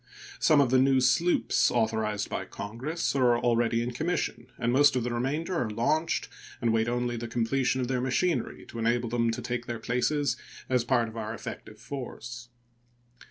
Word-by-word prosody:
Some 150 -2 +5
of 130 -3 +2
the 130 - +5
new 135 0 +4
sloops 130 +8 +3
authorized 110 -3 0
by - - -4
Congress 130 +11 -3
are 125 -3 +4
already 120 -1 +2
in 120 - -3
commission, 155 -4 -2
and 120 +1 0
most 145 +1 +5
of 125 - +1
the 120 0 -2
remainder 145 +9 -1
are 120 - -1
launched 150 +10 0 0.3
and 115 -1 +1
wait 110 0 +2
only 120 0 -1
the 120 +1 -4
completion 125 +2 0
of 125 - -1
their 130 -1 0
machinery 130 +2 0
to 115 - -7
enable 120 +1 +1
them 115 0 +1
to 115 +1 -3
take 120 0 -3
their 120 - -3
places 125 +3 0 0.3
as 125 -2 +2
part 120 -1 +2
of 110 +1 -9
our 110 0 -4
effective 110 -1 -8
force. 120 -1 -7
120 Hz, 180 wpm, -28 LUFS, 115-130 Hz, 0.3 s, Some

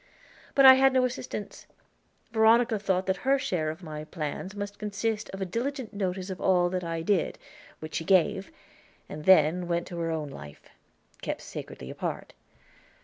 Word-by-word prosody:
But 275 - +6
I 260 - +12
had 265 0 +4
no 255 -1 +4
assistance; 245 -4 -6 0.6
Veronica 225 0 +4
thought 190 -2 0
that 190 0 0
her 275 +1 +2
share 180 - -1
of 160 +4 -7
my 155 -2 -6
plans 155 +5 -5
must 205 0 -6
consist 210 +1 -2
of 195 - -7
a - - 0
diligent 245 +5 -3
notice 190 -1 -3
of 185 - -7
all 175 -2 +3
that 185 -1 -2
I 165 -1 -3
did, 190 -1 +1 0.4
which 155 0 -9
she 165 - -2
gave, 185 -1 +2 0.6
and 150 0 -8
then 175 0 +5
went 170 0 -1
to 175 - -6
her 165 -1 -1
own 155 -3 -3
life, 75 - -11 0.6
kept - - -4
sacredly - - -8
apart. - - -5
190 Hz, 170 wpm, -28 LUFS, 165-220 Hz, 0.6 s, I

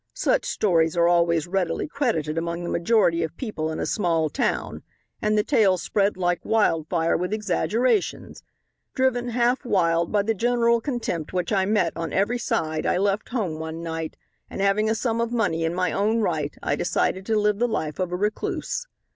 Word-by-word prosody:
Such - - +1
stories 165 -5 +1
are 170 0 +4
always 170 -2 +3
readily 175 - -1
credited 225 - -1
among 170 +1 -3
the 175 - -3
majority 170 -2 +2
of 165 0 -4
people 160 -10 -3
in 155 - -4
a - - -1
small 165 -6 0
town - - -2 0.4
and 215 0 +1
the 210 - +3
tale 205 -9 +3
spread 200 +2 0
like 175 -1 0
wildfire 165 -6 +1
with 180 +2 -2
exaggerations. 215 - 0 0.5
Driven 245 -2 +1
half 240 +2 +1
wild 170 -7 +1
by 205 -1 +2
the 225 +2 +1
general 235 +1 +2
contempt 225 - -3
which 180 +3 -1
I 190 -1 +2
met 195 -5 +1
on 165 -1 -4
every 215 +6 +1
side 160 -11 -1
I - - +2
left 200 +2 0
home 190 -11 -2
one 160 +1 -5
night, 165 -1 -5 0.3
and - - -7
having 200 +2 +2
a 220 - +1
sum 230 0 -1
of 235 0 -1
money 200 -9 0
in 165 +1 -1
my 180 0 0
own 215 +3 +1
right 155 -7 -1
I 145 - +1
decided 185 +3 0
to 220 -1 +2
live 210 0 +1
the 240 - +2
life 155 -10 -3
of 180 -1 -1
a - - -1
recluse. 210 - -2
190 Hz, 190 wpm, -24 LUFS, 165-225 Hz, 0.5 s, are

